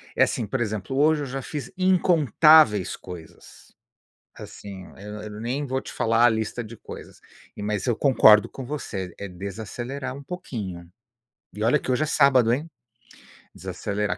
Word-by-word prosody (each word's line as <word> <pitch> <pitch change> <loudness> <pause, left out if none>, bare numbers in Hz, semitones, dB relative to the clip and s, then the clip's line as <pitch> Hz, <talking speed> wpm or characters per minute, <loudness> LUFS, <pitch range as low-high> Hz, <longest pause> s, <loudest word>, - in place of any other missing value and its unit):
é - - +5
assim, 115 - -1
por 130 +3 -2
exemplo, 110 +2 -3
hoje 150 0 +3
eu - - -3
já 135 +1 -5
fiz 150 +7 -6
incontáveis 155 - +4
coisas, 85 -3 -13 0.6
assim 95 -2 -10
Eu 105 +1 -8
eu 105 0 -8
nem 135 +5 -2
vou 130 0 -2
te - - -9
falar 115 +1 +3
a - - +7
lista 110 +2 -2
de 110 +1 -11
coisas - - -11 0.4
e 105 - -7
mas 105 +2 -2
eu 120 - +2
concordo 110 -6 +6
com 135 - -8
você, 100 -10 -5
é 100 - -6
desacelerar 110 +9 -6
um 140 - -10
pouquinho. 105 - -6 0.7
E 105 - -4
olha 125 +6 +3
que 130 - -3
hoje 125 +5 +1
é - - +1
sábado, 130 -6 +4
hein? 155 +6 -3 0.9
Desacelerar, 100 -2 -3
120 Hz, 165 wpm, -24 LUFS, 105-140 Hz, 0.9 s, a